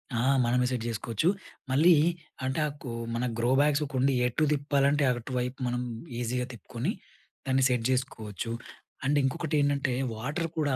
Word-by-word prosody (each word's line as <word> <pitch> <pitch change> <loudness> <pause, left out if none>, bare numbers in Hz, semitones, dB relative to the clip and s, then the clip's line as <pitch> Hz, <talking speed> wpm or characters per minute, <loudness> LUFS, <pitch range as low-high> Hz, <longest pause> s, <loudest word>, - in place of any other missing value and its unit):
ఆ! - - +1 0.2
మనమే 125 +1 +2
సెట్ 120 -3 -2
జేసుకోవచ్చు. 115 - 0 0.4
మళ్ళీ 160 +7 +6 0.5
అంటే 130 +4 -1
ఆకు 145 -3 -8 0.3
మన 120 +2 0
గ్రో 120 +1 +1
బ్యాగ్స్ 150 0 +3
కుండి 135 +1 +3
ఎటు 125 +6 0
తిప్పాలంటే, 145 0 +2
అటువైపు 125 +2 -3
మనం 125 0 -1 0.4
ఈజీగా 125 +1 -1
తిప్పుకొని, 115 - -3 0.5
దాన్ని 135 0 +2
సెట్ 125 -2 +1
జేసుకోవచ్చు. 115 -5 -2 0.5
అండ్ 145 +2 +3
ఇంకొకటి 155 +3 -1
ఏంటంటే, 140 -2 +1 0.2
వాటర్ 145 +9 -2
కూడా 145 -4 +1
130 Hz, 140 wpm, -29 LUFS, 120-145 Hz, 0.5 s, మళ్ళీ